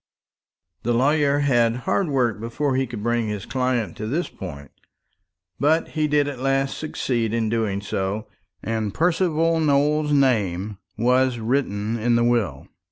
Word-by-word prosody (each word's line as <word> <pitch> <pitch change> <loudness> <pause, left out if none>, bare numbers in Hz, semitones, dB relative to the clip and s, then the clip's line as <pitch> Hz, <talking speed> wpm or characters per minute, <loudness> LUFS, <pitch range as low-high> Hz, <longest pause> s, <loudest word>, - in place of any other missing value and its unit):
The 120 +1 0
lawyer 145 +2 +3
had 120 -5 +3
hard 195 - +1
work 125 -7 0
before 130 +5 -1
he 130 0 0
could 115 -3 -7
bring 120 -1 0
his 105 -2 -4
client 125 -4 -1
to 110 - -4
this 155 +9 -1
point; 70 -7 -9 0.9
but 155 +3 +2
he 155 -1 0
did 145 -1 +2
at 140 -3 -5
last 135 +1 0
succeed 120 -7 -1
in 115 -2 0
doing 110 -3 -1
so, 100 +1 -3 0.4
and 110 -2 -2
Percival 165 -1 +2
Nowell's 150 0 +2
name 105 -8 +1 0.2
was 125 +2 +2
written 115 -2 -1
in 120 +2 +2
the 120 - +3
will. 110 - 0
120 Hz, 150 wpm, -23 LUFS, 110-145 Hz, 0.9 s, lawyer